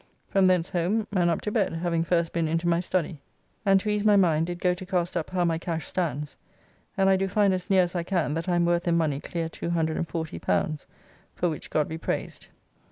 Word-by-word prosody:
From 195 -1 +4
thence 180 -2 +2
home 190 +5 0
and 180 -4 +2
up 170 - 0
to 210 - -3
bed, 205 -6 +1
having 165 0 0
first 170 -1 0
been 170 -1 0
into 165 +2 -1
my 170 0 +3
study, 175 -4 -2 0.5
and 195 0 +6
to 215 - -2
ease 210 -1 0
my 210 -1 +5
mind 165 -4 +3
did 175 0 -5
go 180 0 +2
to 180 - -8
cast 180 -2 -1
up 165 -3 -2
how 180 -1 0
my 165 -1 0
cash 165 -1 -3
stands, 150 -5 -3 0.6
and 195 - +3
I 195 - +5
do 195 +1 0
find 200 0 +3
as 185 -1 -4
near 190 -2 +5
as 175 - -3
I 175 - -1
can 170 -4 -1
that 165 +4 -3
I 175 - +2
am 170 0 +3
worth 175 0 +1
in 170 -1 +3
money 150 -4 0
clear 165 +2 -3
L240, 160 - -2 0.5
for 175 - 0
which 155 - -6
God 150 - +1
be 160 +1 -6
praised. - - -4
175 Hz, 230 wpm, -26 LUFS, 165-185 Hz, 0.6 s, and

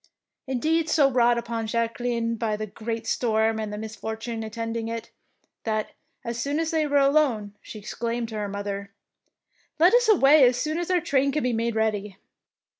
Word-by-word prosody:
Indeed 315 +5 0
so 280 -3 +4
wrought 240 -1 +3
upon 230 -1 -3
was 220 - -5
Jacque 230 0 -1
line 235 -1 -1
by 225 -2 -1
the 215 +1 -4
great 225 +2 -5
storm 220 -1 +1
and 215 -1 -3
the 210 - -5
mis 220 0 -6
fortune 225 +1 -5
attending 225 +1 -4
it, 230 0 -5 0.5
that, 215 -1 -2 0.3
as 235 0 -3
soon 285 +5 -1
as 325 -1 -1
they 315 -2 +1
were 285 0 +2
alone, 275 -8 +2
she - - -10
exclaimed 230 +2 -3
to 220 - -7
her 205 -1 -3
mother, 200 0 -4 0.5
— - - -42
^'Let 350 +5 +6
us 485 -1 +4
away 300 -7 +6
as 245 -1 +5
soon 310 +5 -1
as 350 - -3
our 360 -2 +2
train 275 -2 +1
can 300 +1 -1
be 250 -1 +1
made 230 0 -1
ready. 210 -3 -1
230 Hz, 195 wpm, -25 LUFS, 220-275 Hz, 0.5 s, ^'Let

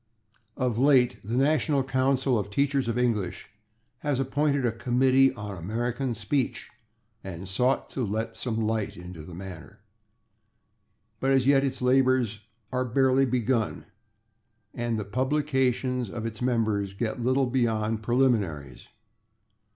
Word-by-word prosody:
Of 125 -3 0
late 130 -3 +4
the 115 +5 -2
National 145 0 +2
Council 130 -1 +1
of 100 -1 -4
Teachers 140 +3 +1
of 115 - -1
English 115 -8 -1 0.5
has 145 -3 -1
appointed 140 0 +1
a 120 - +2
Committee 130 +3 +3
on 105 -2 -6
American 120 +7 -2
Speech 115 +5 -2 0.5
and 95 0 -7
sought 125 +8 0
to 130 - -2
let 110 +2 -3
some 115 -3 -3
light 110 -1 -1
into 90 -2 -9
the 80 +2 -10
matter, 95 0 -10 1.4
but 135 - 0
as 135 -2 +3
yet 135 0 +4
its 135 -2 -2
labors 125 -4 +3 0.3
are 125 0 0
barely 130 +2 +3
begun 120 -2 0 0.9
and 120 -1 -2
the 105 - -4
publications 130 -1 0
of 110 +2 -5
its 110 0 -6
members 110 -5 0
get 110 +3 -3
little 130 +2 +2
beyond 115 -3 0
preliminaries. 105 - 0
125 Hz, 130 wpm, -27 LUFS, 110-130 Hz, 1.4 s, late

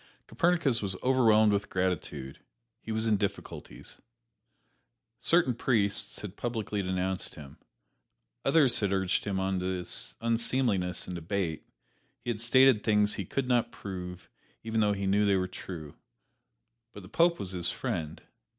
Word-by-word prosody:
Copernicus 170 -9 +1
was 95 -2 -1
overwhelmed 110 -5 +4
with 100 0 -1
gratitude 80 -7 -3 0.4
he 110 - -6
was 110 +1 0
in 110 -2 +3
difficulties. 100 0 -6 1.2
Certain 165 -1 +3
priests 110 -4 0
had 105 -3 -7
publicly 110 -4 -3
denounced 95 0 -1
him; 70 -3 -12 0.8
others 135 -2 +5
had 100 -2 0
urged 95 -1 0
him 100 -2 -1
on 95 0 0
to 90 -1 -2 0.3
unseemliness 115 -5 0
in 90 - -5
debate; 85 -1 -3 0.5
he 120 - -1
had 110 - -4
stated 130 -1 +5
things 105 -1 +3
he 100 - -4
could 135 +8 -2
not 120 -2 +2
prove, 90 -2 -7 0.4
even 110 0 -1
though 105 -1 +3
he 100 0 -3
knew 100 +2 +3
they 100 - +4
were 95 -1 0
true 85 -5 -8 1.0
but 100 - -10
the - - -11
Pope 170 - +3
was 95 - -5
his 90 -2 -1
friend! 80 -1 -4
100 Hz, 145 wpm, -29 LUFS, 95-115 Hz, 1.2 s, others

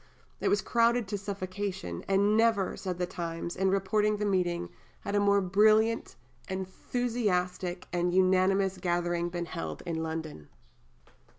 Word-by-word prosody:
It - - -1
was 205 - +2
crowded 235 -1 +2
to 205 - -1
suffocation; 190 - -4
and 200 +2 +3
never, 225 -4 +2
said 185 -3 -4
the 180 - 0
Times, 170 -1 -5
in 190 0 +1
reporting 210 +2 +1
the 210 - -1
meeting, 175 -3 0 0.3
had 200 - -4
a 205 - +3
more 200 0 +4
brilliant, 215 +4 +3 0.3
enthusiastic, 190 -2 -2
and 175 0 +1
unanimous 190 +1 +3
gathering 175 -1 0
been 175 0 -3
held 80 - -6
in 165 -1 -2
London. 160 - -5
190 Hz, 135 wpm, -29 LUFS, 175-205 Hz, 0.3 s, more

